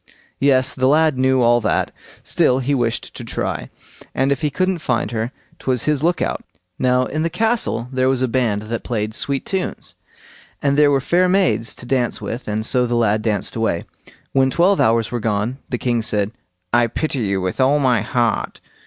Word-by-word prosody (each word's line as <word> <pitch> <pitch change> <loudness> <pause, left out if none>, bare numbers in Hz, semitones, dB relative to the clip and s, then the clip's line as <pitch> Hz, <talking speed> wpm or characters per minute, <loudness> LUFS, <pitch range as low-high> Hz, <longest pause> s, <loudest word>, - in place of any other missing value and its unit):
Yes; 135 -1 +3
the 130 -1 +1
lad 155 +1 +4
knew 130 0 +2
all 120 0 +4
that. 105 - 0 0.3
Still 125 - +2
he 135 +2 -1
wished 120 -4 -1
to - - -8
try, - - -3 0.5
and 135 +1 +2
if 140 - 0
he 150 - +1
couldn't 185 +5 0
find 120 -7 -1
her, 115 +1 -2 0.3
'twas 125 -3 0
his 150 -3 +1
look 175 +1 +1
out. - - -3 0.4
Now 125 0 +2
in 155 +4 -3
the 165 - 0
castle 220 - 0
there 130 0 +1
was 130 -1 +1
a - - +2
band 115 -4 0
that 115 +1 -4
played 110 -2 -2
sweet 140 +4 -2
tunes, 190 -2 -4 0.7
and 140 -1 +1
there 150 0 +5
were 140 -1 +2
fair 180 +6 +2
maids 115 - +1
to - - -10
dance 125 -1 0
with, 120 +3 -6
and 105 +1 -2
so 125 +1 +2
the 120 - -1
lad 110 -2 +2
danced 105 -3 -1
away. 110 -7 0 0.5
When 135 -1 +3
twelve 180 +7 +3
hours 115 0 +2
were 120 - -2
gone, 110 +4 -1
the 125 - -1
king 120 -1 0
said: 105 -2 0 0.4
"I 120 0 +4
pity 140 +4 -2
you 100 -4 0
with 95 +7 -2
all 135 +3 +4
my 125 -6 +2
heart. 120 +1 -1
125 Hz, 195 wpm, -20 LUFS, 115-140 Hz, 0.7 s, there